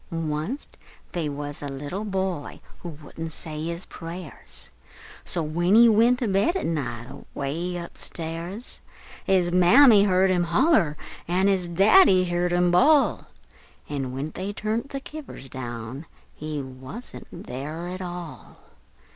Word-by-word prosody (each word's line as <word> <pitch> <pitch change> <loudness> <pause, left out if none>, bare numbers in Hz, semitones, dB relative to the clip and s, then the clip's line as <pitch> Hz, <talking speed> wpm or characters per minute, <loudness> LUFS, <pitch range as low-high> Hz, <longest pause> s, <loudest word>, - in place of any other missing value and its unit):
Wunst 165 - -3 0.3
they 165 -4 -2
wuz 145 0 -5
a 145 - -4
little 145 +8 -5
boy 190 -6 -3 0.2
wouldn't 160 0 -7
say 155 -1 -4
his 170 +2 -3
prayers, 165 -1 -7 0.6
An' 155 -3 -2
when 175 +4 +3
he 235 +1 +8
went 230 +3 +5
to 245 - -1
bed 200 - +2
at 380 - -1
night, 125 -8 -2
away 165 +6 -4
up 170 0 -8
stairs, 170 +7 -4 0.4
His 180 -2 +3
Mammy 205 +5 +7
heerd 190 -1 +3
him 175 -1 +2
holler, 170 - +3 0.3
an' 185 +3 +2
his 190 -3 +2
Daddy 190 - +6
heerd 175 0 0
him 175 0 +3
bawl, 285 - +4 0.6
An' 135 -3 -3
when 135 +4 -4
they 190 +5 -4
turn't 220 +5 -2
the 275 -1 -5
kivvers 295 - -9
down, 120 +3 -6 0.3
he 150 -2 -5
wuzn't 130 - -7
there 155 0 -6
at 185 +1 -5
all! 175 -3 -8
175 Hz, 140 wpm, -25 LUFS, 150-195 Hz, 0.6 s, he